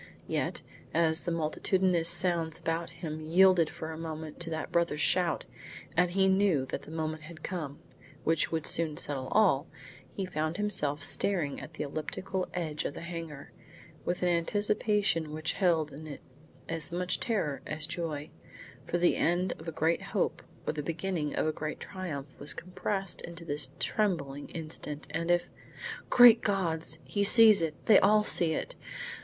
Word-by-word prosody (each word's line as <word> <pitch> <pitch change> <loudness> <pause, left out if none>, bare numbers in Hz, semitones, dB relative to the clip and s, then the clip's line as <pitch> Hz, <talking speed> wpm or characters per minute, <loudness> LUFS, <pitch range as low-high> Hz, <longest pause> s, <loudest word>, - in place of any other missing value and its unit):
Yet, - - -2 0.3
as 160 -1 +3
the 175 - -3
multitudinous 170 +2 +1
sounds 170 -2 +1
about 165 +1 -2
him 155 -2 -6
yielded 170 +1 +5
for 160 0 -6
a 160 - -7
moment 160 -1 -6
to 170 -1 -4
that 160 -1 -4
brother's 170 -3 +1
shout, 175 -3 +2 0.5
and 180 +1 +4
he 190 +2 +3
knew 190 -8 +3
that - - -3
the - - -13
moment 155 0 -3
had 155 +1 -11
come, 155 -6 -4 0.5
which 165 0 +1
would 160 -2 -1
soon 160 -2 0
settle 135 -3 -2
all, 175 -8 +3 0.5
he 195 - -2
found 160 -1 -2
himself 150 -9 -1
staring 165 -4 +2
at 155 - -10
the - - -3
elliptical 180 +6 -4
edge 155 -4 -2
of - - -4
the - - -7
hangar, 165 -4 -7 0.5
with 180 +1 -2
an 180 - +3
anticipation 205 -1 +1
which 155 +1 -2
held 165 -5 +1
in 155 +3 -9
it 145 - -8 0.5
as 165 -2 -2
much 180 +1 -1
terror 190 - -1
as 155 0 -3
joy, 160 -2 -4 0.6
for 175 - 0
the 175 0 +3
end 175 +2 +1
of 160 - -11
a - - -2
great 160 +2 +1
hope - - -1 0.2
or - - -1
the 150 - -3
beginning 165 0 -2
of - - +1
a 155 - +2
great 155 0 -5
triumph 165 -8 -6
was 145 - 0
compressed 190 +1 -3
into 170 0 -9
this 145 -3 0
trembling 155 -10 -1
instant 155 -2 -5
and 165 +2 -2
if 175 0 +2 0.6
Great 240 -2 +8
God! 175 -6 0 0.2
he 205 - -1
sees 220 -2 +8
it! 160 -2 -1
They 215 - +8
all 210 +1 +5
see 170 -5 +5
it! - - -3
165 Hz, 170 wpm, -30 LUFS, 155-185 Hz, 0.6 s, Great